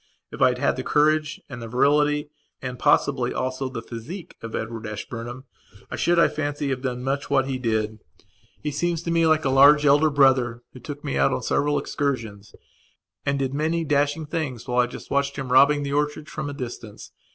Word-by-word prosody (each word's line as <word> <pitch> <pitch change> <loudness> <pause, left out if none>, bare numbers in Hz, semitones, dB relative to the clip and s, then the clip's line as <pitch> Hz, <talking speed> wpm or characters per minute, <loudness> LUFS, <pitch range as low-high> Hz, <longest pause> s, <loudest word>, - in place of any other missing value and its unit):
If - - -8
I - - +7
had - - -2
had - - +1
the - - -3
courage 150 0 +2
and 125 -4 -8
virility 145 +5 +1 0.3
and 125 -1 -6
possibly 135 -4 +2
also 130 +1 -2
the 115 -4 -6
physique 145 - -8
of 115 -1 -6
Edward 115 0 -4
Ashburnham 115 +4 -6 0.5
I - - -2
should, 175 0 +2
I 170 - +6
fancy, 145 -1 -3
have 130 -2 -2
done 125 -2 -3
much 135 +2 -2
what 135 -2 +3
he 130 -1 -3
did. 110 -2 -1 0.6
He 150 - -1
seems 170 +3 -1
to 170 - -2
me 165 -1 +3
like 155 -1 +2
a - - +2
large 145 +2 +6
elder 145 +2 +5
brother 130 -4 +3
who 130 - -11
took 145 +4 -8
me 140 - -2
out - - +4
on 125 - -2
several 145 0 +1
excursions 115 -10 -3 0.7
and 140 0 +1
did 135 -1 -2
many 160 +3 0
dashing 145 +2 +1
things 145 -7 -4
whilst 125 0 +2
I - - -14
just - - -10
watched 140 0 0
him 135 -3 -5
robbing 140 +3 +5
the 140 0 -3
orchards, 150 +1 -1
from 150 -2 -4
a - - -5
distance. 120 -5 -8
140 Hz, 200 wpm, -24 LUFS, 125-150 Hz, 0.7 s, I